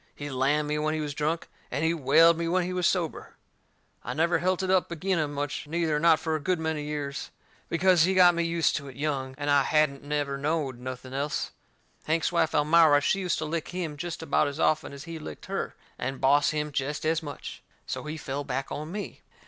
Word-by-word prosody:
He 145 0 -6
lammed 140 +3 +1
me 150 0 -1
when 155 +1 0
he - - -2
was 150 -2 -3
drunk, 155 +3 -1 0.2
and 150 - -2
he 165 - +3
whaled 165 +3 +5
me 165 +1 -2
when 180 +2 +2
he 180 +1 -3
was 180 -1 +2
sober. 175 -4 -2 0.7
I 125 - -4
never 165 +3 +2
helt 185 +1 0
it 185 - 0
up 185 -2 +2
agin 180 +2 0
him 150 -2 -1
much, 145 0 -4
neither, 160 -1 0
not 165 0 +5
fur 160 -1 -1
a - - -1
good 180 +3 0
many 160 -1 -2
years, 145 -2 -4 0.4
because 180 +1 +4
he 185 +4 +3
got 180 -1 +7
me 170 - 0
used 170 -1 +1
to 140 -2 -7
it 135 - -10
young, 135 -3 -2
and 145 0 -4
I 140 -1 +5
hadn't 145 -1 +2
never 145 -1 -2
knowed 145 -4 -1
nothing 130 +1 -7
else. 140 +1 -2 0.5
Hank's 160 +1 +1
wife, 170 -2 +1
Elmira, 150 0 +5
she 170 +7 +1
used 180 -2 0
to 155 - -3
lick 160 +1 -3
him 175 -4 -4
jest 165 +2 -5
about 160 - +2
as 145 +2 -5
often 155 -2 +1
as 140 0 -9
he 165 0 -7
licked 155 - -9
her, - - -3 0.2
and 135 0 -3
boss 145 +5 +4
him 150 -1 -2
jest 145 +2 -2
as 160 +1 +1
much. 145 -3 -8 0.2
So - - -5
he 155 +1 -5
fell 140 -1 -4
back 135 0 -3
on 155 +2 -5
me. 205 +2 -6
155 Hz, 225 wpm, -27 LUFS, 145-170 Hz, 0.7 s, got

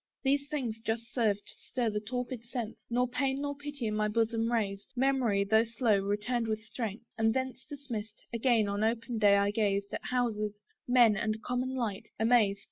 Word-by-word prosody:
These 280 +1 +1
things 250 -7 -2
just 230 +1 -3
served 210 -4 +1
to - - -8
stir 240 -3 0
the 210 - -1
torpid 245 +2 -4
sense, 235 -2 -6
Nor 250 +1 +2
pain 265 +2 0
nor 285 0 -2
pity 290 -3 -6
in 215 - 0
my 215 0 +2
bosom 225 +1 +1
raised. 200 -3 -1
Memory, 250 -6 +2
though 220 +3 +4
slow, 230 -2 +2
returned 210 +4 -1
with 220 0 -2
strength; 225 0 -5
and 225 0 +3
thence 260 -1 -2
Dismissed, 235 -7 -6
again 230 -2 +3
on 200 +1 -1
open 230 +1 0
day 205 -1 +6
I 200 0 +2
gazed, 200 -2 0
At - - -4
houses, 215 -4 -1 0.3
men, 240 -4 +6
and 220 +2 -2
common 255 +1 -1
light, 225 -6 -3
amazed. 220 -3 +4
230 Hz, 185 wpm, -31 LUFS, 210-250 Hz, 0.3 s, day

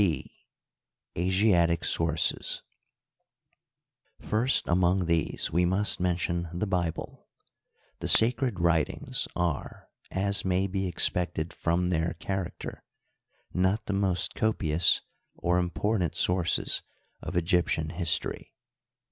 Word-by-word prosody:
b, 85 -9 0 0.8
Asiatic 90 -2 +2
Sources. 80 0 0 0.8
— - - -49
First 120 +5 +2
among 90 +1 +2
these 85 -3 0
we 90 +3 +2
must 95 +4 +1
mention 85 -1 -1
the 90 +4 -2
Bible. 90 -5 -3 0.7
The - - -4
Sacred 115 -2 +5
Writings 85 -2 +1
are, 85 -5 -3 0.2
as 100 +1 0
may 95 0 +1
be 95 0 -2
expected 85 -1 0
from 90 +1 0
their 85 -1 -1
character, 95 -2 -5 0.7
not 95 +5 +1
the 105 - -2
most 95 -4 0
copious 85 -7 +2 0.3
or 90 +1 +1
important 90 0 -1
sources 90 -1 0 0.4
of - - -4
Egyptian 85 -2 +1
history. 85 -2 -1
90 Hz, 105 wpm, -28 LUFS, 85-95 Hz, 0.8 s, Sacred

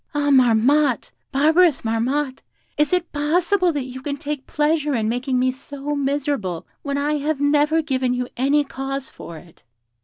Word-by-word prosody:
Ah, 290 0 +1
Marmotte! 255 +2 +3 0.2
barbarous 315 +3 +3
Marmotte! 260 +5 -1 0.3
Is 300 -1 +1
it 360 -2 0
possible 345 +5 +2
that 290 -4 -2
you 260 0 -8
can 285 +1 -4
take 290 -2 -5
pleasure 300 -1 +1
in 220 -2 0
making 250 +3 -1
me 255 +1 +2
so 280 +2 -6
miserable 275 - -2 0.2
when 280 -1 -3
I 295 +1 0
have 295 0 -1
never 295 +2 +2
given 260 -4 0
you 250 0 -2
any 280 +4 +2
cause 270 0 -5
for 165 - -10
it?' 170 0 -17
285 Hz, 160 wpm, -21 LUFS, 260-295 Hz, 0.3 s, Marmotte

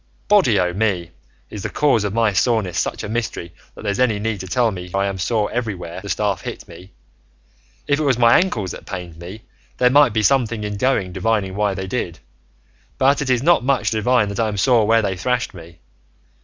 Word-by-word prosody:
Body 185 - +4
o' 90 -1 0
me! 95 -5 -1 0.4
is 105 - -6
the 105 - -3
cause 120 -1 +2
of 105 - -2
my 110 -1 +1
soreness 100 -4 +1
such - - -2
a - - -4
mystery 105 -6 -4 0.2
that - - -11
there's 100 +2 -2
any 120 -5 +2
need 105 0 -3
to 95 - -7
tell 115 +5 +1
me 90 -2 -7
I 100 0 +1
am 95 -1 -3
sore 105 +2 0
everywhere 95 -8 -4
the 100 - -8
staff 100 -4 -1
hit - - -7
me? 90 +3 -13 1.0
If 145 0 +1
it - - 0
was 135 -5 +2
my 115 -1 +6
ankles 110 - -2
that - - -10
pained 90 -4 -7
me 95 +6 -9 0.3
there 125 0 +3
might 145 -2 +5
be 110 0 0
something 115 -2 +1
in 105 -1 -4
going 100 -6 0
divining 105 -4 -1
why 105 -1 0
they 95 +1 -4
did, 95 -5 -3 0.8
but 140 +2 +3
it 135 - -2
is 125 -1 +2
not 170 -4 +4
much 125 -6 +1
to 110 - -1
divine 110 -1 +2
that 100 - -5
I'm 110 -3 0
sore 115 0 +3
where 115 0 +3
they 95 -2 -1
thrashed 125 +6 -1
me. 85 -2 -13
105 Hz, 215 wpm, -20 LUFS, 95-120 Hz, 1.0 s, my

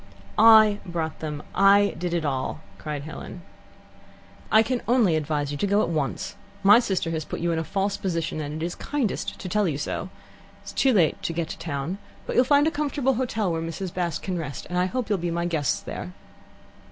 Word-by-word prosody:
"I 215 -2 +7
brought 165 -3 -4
them. 150 -2 -5
I 200 +1 +5
did 175 +1 -3
it 165 -2 -1
all," 135 +2 -2 0.2
cried 150 -2 -4
Helen. 160 +3 -8 1.1
"I 220 +1 +7
can 250 +1 -1
only 230 -8 +4
advise 150 -2 -1
you 145 - -4
to 205 - +1
go 205 +2 +3
at - - -1
once. 150 -5 -2 0.3
My 205 +4 +8
sister 190 -8 -1
has 160 -1 -2
put - - -6
you 170 0 0
in 165 - 0
a - - -1
false 195 +3 -1
position, 165 -4 -2
and 150 +2 -4
it - - +1
is 175 - -3
kindest 275 -8 -2
to - - -6
tell 210 +2 +1
you 150 -4 -1
so. 150 +5 -3 0.5
It's 200 - -9
too 270 - +3
late 180 -9 +2
to 165 - -2
get 165 -1 -2
to - - -6
town, 160 +4 -3 0.3
but - - -4
you'll 250 - +5
find 285 +2 +4
a 320 - +2
comfortable 285 -3 0
hotel 225 -5 -1
in 165 - -2
Oniton, - - -3
where 165 - -3 0.2
Mrs. - - -19
Bast 175 -2 -2
can 185 -2 -2
rest, 145 -4 -6
and 180 - +1
I 180 - +2
hope 250 +3 -2
you'll 205 -3 0
be 175 +1 -2
my 170 +1 -1
guests 160 -5 0
there." 90 - -6
175 Hz, 225 wpm, -25 LUFS, 160-210 Hz, 1.1 s, My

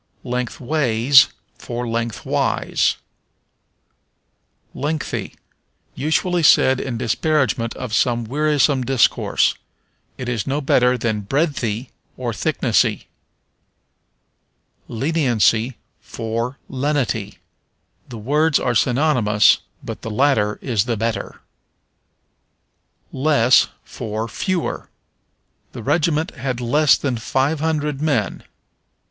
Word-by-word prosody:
Lengthways 125 +1 +2 0.3
for 120 0 -5
Lengthwise. 115 -2 0 1.8
Lengthy. 150 +2 -3 0.6
Usually 160 +5 0
said 130 -4 +5
in 125 -3 -4
disparagement 130 0 0
of 125 -4 -6
some 120 0 +1
wearisome 145 +1 +1
discourse. 130 -2 +2 0.6
It 130 - -6
is 120 -5 -2
no 140 +2 0
better 125 -3 +3
than 110 -3 -1
breadthy, 130 -2 -2 0.3
or - - -3
thicknessy. - - 0 1.8
Leniency 120 -4 +1 0.2
for 115 +3 -4
Lenity. 130 -7 -2 0.7
The 120 - -8
words 150 +7 +2
are 125 - 0
synonymous, 120 -4 +3 0.2
but - - -7
the - - -6
latter 110 -3 +1
is 115 -6 0
the 120 -2 -1
better. 115 +1 -3 1.7
Less 130 -3 +4 0.2
for 110 +1 -5
Fewer. 185 - -3 0.8
"The - - -8
regiment 160 -1 +1
had 130 -2 -4
less 145 +5 +3
than 130 -4 -2
five 135 +7 0
hundred 150 -2 -1
men." 135 -10 -1
125 Hz, 90 wpm, -20 LUFS, 115-145 Hz, 1.8 s, said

